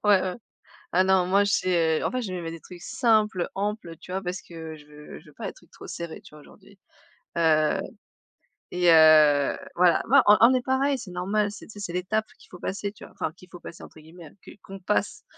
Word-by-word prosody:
Ouais, 205 -2 +5
ouais. 185 -1 -3 0.6
Ah 185 +1 +3
non, 190 -1 +3
moi 200 +2 +3
j'ai, 170 -5 +1
heu, - - -3
en - - 0
fait 255 0 -2
je 205 - -5
me 180 - -4
mets 165 -1 -5
des 165 - -8
trucs 175 +2 -13
simples, 215 -4 +1
amples, 200 -4 -4
tu 180 - -13
vois? 190 +1 -2
Parce 180 0 -5
que 160 -2 -9
je 150 -1 -16
veux 150 0 -12
je 160 - -22
veux 150 - -17
pas - - -6
des - - -7
trucs - - -22
trop - - -12
serrés, 170 -2 -7
tu - - -17
vois 150 - -14
aujourd'hui, 200 +6 -19 0.6
heu 155 -2 +3 0.9
et 180 -1 +3
heu, 155 -3 +6 0.2
voilà. 175 -1 +3
Non, - - +7
on 210 - +8
on 235 +2 +7
on - - +3
est 255 - +1
pareil, 270 +2 0
c'est 225 -7 -9
normal 200 +4 -1
c'est 210 - -11
tu - - -13
sais 205 - -11
c'est 190 -4 -5
l'étape 185 +5 -1
qu'il - - -20
faut 180 - -12
passer, 200 +2 -4
tu 210 - -16
vois? - - -16
Enfin - - -3
qu'il 185 - -18
faut 175 - -11
«passer» 170 - -11
entre 155 - -14
guillemets, 160 0 -14
qu'une - - -14
qu'on 195 +1 -11
passe 105 - -2
180 Hz, 245 wpm, -25 LUFS, 165-205 Hz, 0.9 s, on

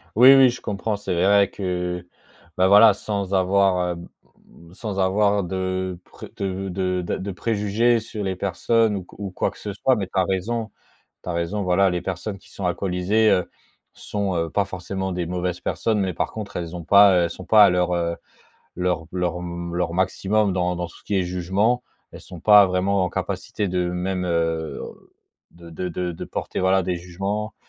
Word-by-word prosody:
Oui, 125 +5 +9
oui 135 -1 +7
je 125 - -6
comprends. 105 +2 -2
C'est 100 -2 -4
vrai 100 +3 +4
que, 90 -2 -3 0.5
bah, 95 +1 +4
voilà, 105 +2 +8
sans 100 -1 -4
avoir, 95 -1 +2
hem, 85 0 -7 0.7
sans 100 0 -5
avoir 100 +2 +2
de 95 0 -3
pré - - -12
de 95 0 -3
de 90 0 -1
d'a 85 - -3
de 100 +1 -4
préjugés 110 +3 +1
sur 110 -1 -6
les 95 -1 -2
personnes 105 +4 +1
ou 95 -3 -5
ou 100 -2 -5
quoi - - -1
que - - -17
ce 105 - -5
soit. 130 +6 +2
Mais 100 -5 -3
tu - - -34
as - - +4
raison, 110 +4 -2 0.5
tu - - -9
as - - -1
raison 85 +5 -2
voilà, 95 +1 +3
les 90 -1 -2
personnes 95 +3 -4
qui - - -20
sont 95 - -4
alcoolisées, 95 +4 +1
heu, 90 - +1 0.4
sont, 100 -3 -3
heu, 85 -1 -1
pas 100 - +1
forcément 95 0 -4
des 90 -1 -3
mauvaises 90 0 -3
personnes. 110 -2 -1
Mais 95 -2 0
par - - -2
contre, 110 -2 -7
elles 85 0 -4
ont 85 - -7
pas, 100 +2 +7
heu, - - +3
elles 85 - -2
sont 95 - -9
pas 110 -1 +7
à 100 - +6
leur, 90 0 +1
heu, 85 -1 -1 0.6
leur 90 -2 -1
leur 90 -1 -1
m 85 -1 -6
leur 85 -1 -1
maximum 95 +3 +1
dans 90 -1 0
dans 90 0 -4
ce - - -17
qui 105 - -1
est - - +1
jugement. 95 +7 0 0.3
Elles - - -10
sont 90 - -11
pas 105 0 +7
vraiment 95 +1 +1
en 90 - -2
capacité 100 -2 -3
de 90 0 0
même, 90 +1 -2
heu, 80 -2 -1 0.7
de 85 0 -14
de 90 +1 -4
de 80 - -7
porter, - - -4
voilà, 95 +1 +3
des 90 0 -2
jugements. 95 +5 -4
95 Hz, 195 wpm, -23 LUFS, 90-100 Hz, 0.7 s, Oui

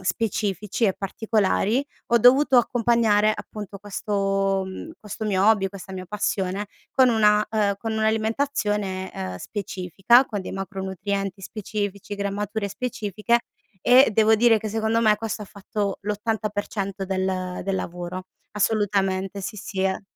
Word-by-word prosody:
specifici 205 +1 -1
e 195 -3 +3
particolari, 215 +4 0 0.2
ho 235 - +4
dovuto 260 +3 +6
accompagnare, 230 -3 +3
appunto, 205 -2 -8
questo, 195 -1 0
mhmm, 190 +12 -7
questo 210 +1 -6
mio 195 -2 +2
hobby, 215 -3 +4
questa 190 0 -10
mia 185 -1 -6
passione 195 0 -2 0.3
con 260 -1 +5
una 210 -2 +4
ehm, 210 -2 +1
con 225 +1 -3
un'alimentazione, 220 -3 0
ehm, 95 -1 -5
specifica 200 - +2
con 210 -6 -4
dei 185 - -7
macronutrienti 195 0 -4
specifici, 205 -1 -4
grammature 200 +1 -2
specifiche 220 0 -1 0.4
e 250 +1 +7
devo 220 +1 +5
dire 230 0 +5
che 215 0 -4
secondo 220 +1 +1
me 215 -2 +4
questo 220 0 -4
ha - - -6
fatto 200 0 -4
l'80% 205 -2 -2
del 185 -1 -2
del 195 0 -1
lavoro, 180 +1 -5 0.2
assolutamente 200 -2 0
sì, 200 +2 -5
sì, 195 -1 -5
eh. 190 0 0
205 Hz, 135 wpm, -24 LUFS, 195-220 Hz, 0.4 s, e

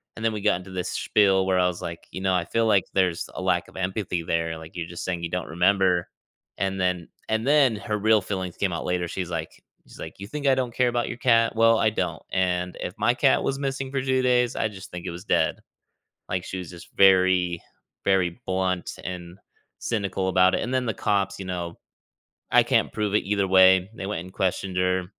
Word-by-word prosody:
and 110 - -8
then 110 - +2
we 105 - -4
got 105 -2 +3
into 95 +1 -11
this 90 0 -3
spiel 95 -2 +2
where 95 -1 +2
I 90 - +4
was, 90 -1 -3
like, 85 0 -7
"You 95 - -6
know, 95 -1 +1
I 85 - 0
feel 115 +6 0
like 100 -3 +3
there's 90 -3 0
a - - -4
lack 90 -2 +1
of - - -18
empathy 95 -2 -2
there, 80 0 -1
like, 80 0 -12
you're 85 -2 -4
just 85 - -7
saying, 90 -2 -3
"You 85 - -2
don't 90 +1 -3
remember." 90 +1 +2 0.5
And 95 0 -1
then 90 -2 0 0.2
and 110 +1 0
then 140 -5 +4
her 105 +1 -3
real 110 +1 +3
feelings 95 -2 -4
came 95 -3 0
out 85 - -4
later 90 -1 -1
she's, 90 0 -4
like 85 - -6 0.2
she's - - -15
like, 80 - -7
"You 100 - -6
think 145 +5 -3
I 135 - +5
don't 125 -2 -2
care 125 +1 +2
about 120 0 -1
your 120 - -5
cat? 115 -3 +3
Well, 115 0 +5
I 110 - +3
don't 90 -6 -3
and 90 -1 0
if 90 - -4
my 120 +2 +2
cat 135 +2 +3
was 135 - -1
missing 135 -1 -3
for 135 -1 -1
2 130 0 +1
days, 125 -1 +2
I 110 - 0
just 95 -2 -11
think 90 0 -7
it 90 - -3
was 85 +2 -8
dead." - - +2 0.8
Like, 90 0 -2
she 95 - -6
was 90 -3 -7
just 85 -2 -12
very, 95 -2 +4 0.4
very 95 +1 +1
blunt 95 -1 -2
and 90 0 -7 0.4
cynical 100 -4 -2
about 95 0 +4
it, - - 0
and 125 - -3
then 130 -1 +1
the 115 - -1
cops, 100 -1 0
you 95 - -6
know 85 -2 -5 0.7
I - - +7
can't - - +1
prove 105 -2 -2
it 105 - +2
either 100 0 0
way, 95 0 +6
they 100 - -6
went 105 -4 -3
and 90 - -12
questioned 95 0 -2
her. 90 0 +1
95 Hz, 230 wpm, -25 LUFS, 90-110 Hz, 0.8 s, I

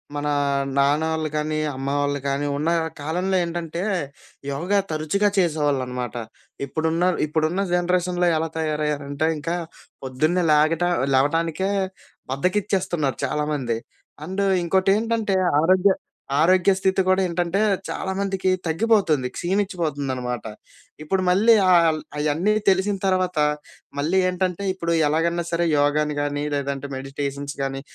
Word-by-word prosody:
మన 145 0 -2 0.5
నాన్న 145 +3 +3
ఆళ్ళు 155 -1 -2
గానీ 155 0 -1 0.2
అమ్మ 135 +1 -5
వాళ్ళు 145 0 0
గానీ 140 +1 -1
ఉన్న 155 +3 -1 0.3
కాలంలో 180 +6 -1
ఏంటంటే 170 0 -4 0.7
యోగా 180 +9 0
తరచుగా 155 +7 +1
చేసేవాళ్ళన్నమాట. 135 - 0 0.5
ఇప్పుడున్న, 160 +4 -1 0.2
ఇప్పుడున్న 160 +5 0
జనరేషన్‌లో 180 0 +1
ఎలా 160 0 -1
తయారయ్యారంటే 150 -1 -1
ఇంకా. 165 +4 -2 0.5
పొద్దున్నే 155 +8 0
లేగట 155 +3 +3 0.3
లేవటానికే 165 +7 +1 0.6
బద్ధకిచ్చేస్తున్నారు 180 -2 0
చాలామంది. 145 -6 -1 0.5
అండ్ 190 +3 -2 0.2
ఇంకోటేంటంటే 200 +4 +1 0.3
ఆరోగ్య 185 +3 +4 0.5
ఆరోగ్య 185 +3 +4
స్థితి 190 0 +2
గూడా 185 +1 +3
ఏంటంటే 175 +2 -1 0.3
చాలామందికి 190 0 -2 0.2
తగ్గిపోతుంది. 165 - +2
క్షీణించిపోతుందన్నమాట. 145 - -2 0.6
ఇప్పుడు 185 +5 0
మళ్ళీ 210 +6 +5 0.2
ఆల్ 165 -3 +4 0.2
అయన్నీ 155 +8 +1 0.2
తెలిసిన 195 +1 +2
తర్వాత 185 -3 +1 0.6
మళ్ళీ 160 +6 +1
ఏంటంటే 185 +1 -2
ఇప్పుడు 170 -2 -2
ఎలాగన్నా 170 +3 0
సరే 170 0 +1
యోగాని 150 +1 +1
గానీ 145 0 -2
లేదంటే 140 0 -3
మెడిటేషన్స్ 140 +1 -5
గానీ 135 0 -3
165 Hz, 105 wpm, -23 LUFS, 145-185 Hz, 0.7 s, మళ్ళీ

